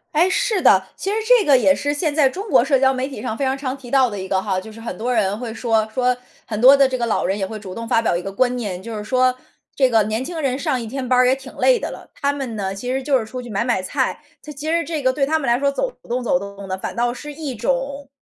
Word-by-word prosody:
哎， 340 +4 +4
是 435 0 +1
的。 - - +5
其 390 - -3
实 415 - 0
这 485 -2 +5
个 280 -3 +6
也 285 +3 +4
是 290 0 -1
现 300 0 -1
在 290 -2 +4
中 395 +10 -5
国 - - +5
社 275 - +3
交 265 0 +3
媒 260 +1 -2
体 265 -7 -8
上 220 - -3
非 275 - -1
常 265 +1 0
常 270 -1 -4
提 260 -3 -12
到 260 -1 +4
的 205 -2 -6
一 190 - -5
个 190 0 +1
哈， 190 -2 -1
就 220 - -10
是 225 +1 -12
很 230 - -6
多 245 +3 -1
人 205 -2 +1
会 235 -2 -5
说 225 -2 +1
说 250 0 +2 0.3
很 215 -2 -4
多 265 +4 +8
的 275 -1 +5
这 260 -1 -1
个 235 - -1
老 230 - 0
人 195 +2 0
也 190 - -1
会 220 - -6
主 190 -3 -8
动 230 0 -6
发 230 - +3
表 225 - +1
一 175 - -4
个 195 - -5
观 245 +5 +1
念， 190 -6 -4
就 225 -2 -6
是 210 - -6
说 255 +2 +3 0.4
这 265 -2 +3
个 225 -3 +4
年 220 +4 -2
轻 330 +1 -5
人 270 -1 -1
上 275 -5 -1
一 230 - -5
天 255 +2 -4
班 255 - +3
儿 250 - +5
也 255 - +4
挺 265 0 -8
累 - - +3
的 - - -4
了， - - -11
他 285 0 -1
们 260 -6 -5
呢， 195 -1 -3
其 245 +6 -4
实 265 +1 -1
就 270 0 +2
是 230 - -2
出 250 +3 -6
去 245 - -10
买 205 +2 -1
买 240 -6 0
菜， 185 - -1 0.2
他 300 - -8
其 300 +2 -5
实 335 0 +2
这 320 -3 -3
个 260 -1 +2
对 275 0 +1
他 315 +3 +1
们 275 - -3
来 235 +1 +3
说 280 +1 +1
走 - - -1 0.2
动 250 +1 -1
走 225 -7 +2
动 200 +1 -8
的， 185 0 -3
反 - - -5
倒 240 0 0
是 295 +4 -8
一 290 -4 -5
种 270 +4 -2
255 Hz, 335 characters per minute, -21 LUFS, 220-280 Hz, 0.4 s, 多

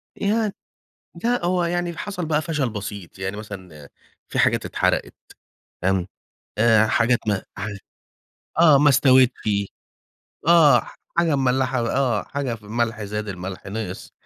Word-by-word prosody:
يعن 215 +1 0 0.7
لأ، 245 -6 +1
هو 180 0 +1
يعني 175 0 -2
حصل 180 -2 -4
بقى 155 0 +1
فشل 150 -7 -1
بسيط 100 -4 -7
يعني 95 +2 -4
مثلًا 95 -9 -10 0.4
في - - -4
حاجات - - +3
اتحرقت - - 0 0.7
فاهم، 95 0 +1 0.5
آآ، 110 -1 +5
حاجات 120 +2 +2
ما 100 -2 0
حاج 100 0 -5 0.8
آه، 155 -5 +7
ما 145 - +5
استوتش، 130 -2 +5 1.2
آه، 155 -7 +7
ح - - -14 0.2
حاجة 165 -4 +3
مملّحة 130 0 +1
آه، 125 -6 +1
حاجة 140 -4 -3
ف 110 - -13
ملح 115 +1 -2
زاد، 105 +1 -4
الملح 95 0 -6
نِقِص 100 -2 -6
120 Hz, 135 wpm, -22 LUFS, 105-150 Hz, 1.2 s, آه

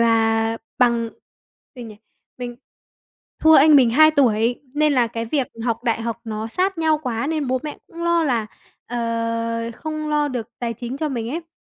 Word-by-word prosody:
là 225 0 +2 0.2
bằng 235 -2 +3 0.7
gì 245 - -8
nhỉ? 220 -3 -10 0.4
Mình 245 -1 -6 0.8
thua 315 0 +6
anh 305 +1 +7
mình 250 -4 +5
2 310 +5 +6
tuổi 240 -3 +2
nên 300 0 +3
là 245 -4 +3
cái 230 0 -5
việc 270 +1 0 0.2
học 235 0 -2
đại 230 -1 0
học 230 0 -4
nó 220 0 -4
sát 370 - -1
nhau 315 -1 +2
quá 240 0 -2
nên 310 -2 -1
bố 255 0 0
mẹ 300 -1 -6
cũng 335 0 -9
lo 340 -1 +3
là, 235 -6 0 0.4
ờ, 230 -1 -2
không 310 +1 -5
lo 295 -1 +1
được 240 -4 -4
tài 235 -1 -2
chính 245 +4 -6
cho 310 0 -1
mình 235 -4 -3
ấy. 330 +2 -5
245 Hz, 185 wpm, -21 LUFS, 230-300 Hz, 0.8 s, anh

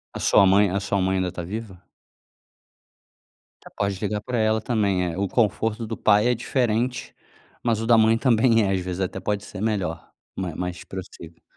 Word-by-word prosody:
A - - -4
sua 100 - +5
mãe 100 +1 +4
a 100 +2 -1
sua 100 0 -1
mãe 95 +1 +1
ainda 95 -1 -1
tá 90 - -6
viva? 95 0 -7 1.9
Pode 100 -2 -1
ligar 105 +1 -2
para 125 +3 -3
ela 110 0 +1
também 100 -7 0
é - - -7
o 100 +1 0
conforto 110 +1 0
do 115 - -4
pai 105 +3 +3
é 125 - +2
diferente, 120 0 -1 0.5
mas 115 -3 +1
o 115 - -3
da 115 -1 +6
mãe 110 +1 +4
também 115 -2 +3
é. 95 - 0
Às 95 - 0
vezes 90 0 -5
até 95 0 -3
pode 100 -1 -2
ser 95 - -8
melhor, 100 -7 -2 0.2
ma 90 -3 -4
mais 90 0 -5
possível. 90 -3 -10
100 Hz, 185 wpm, -24 LUFS, 95-115 Hz, 1.9 s, da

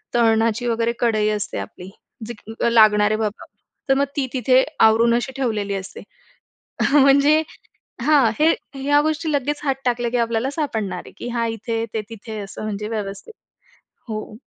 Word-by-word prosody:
तळणाची 230 0 +2
वगैरे 230 0 0
कढई 215 -3 +2
असते 210 0 -3
आपली 185 -3 -8 0.4
जी 240 - -5 0.4
लागणार 210 -2 +5
आहे 215 - +1
बाबा, 215 -1 -3 0.4
तर 270 - +6
मग 280 +1 +2
ती 270 - 0
तिथे 255 0 +4 0.2
आवरून 230 +2 +5
अशी 240 +3 -2
ठेवलेली 215 -6 -1
असते. 195 0 -7 0.9
म्हणजे 285 +2 +5 0.6
हां. 285 -7 +4
हे 320 +2 +5 0.2
ह्या 285 +2 +2
गोष्टी 315 +1 -1
लगेच 290 +1 -1
हात 275 -2 +1
टाकल्या, 240 -1 0
की 245 - -1
आपल्याला 235 +2 0
सापडणार 220 - -3
आहे, - - -13
की - - -6
हा 235 -1 0
इथे 225 0 -3
ते 220 - -1
तिथे 220 0 -8
असं 200 +1 -8
म्हणजे 210 0 -4
व्यवस्थित. 210 - -5 0.8
हो. 215 -1 -6
230 Hz, 155 wpm, -21 LUFS, 215-270 Hz, 0.9 s, तर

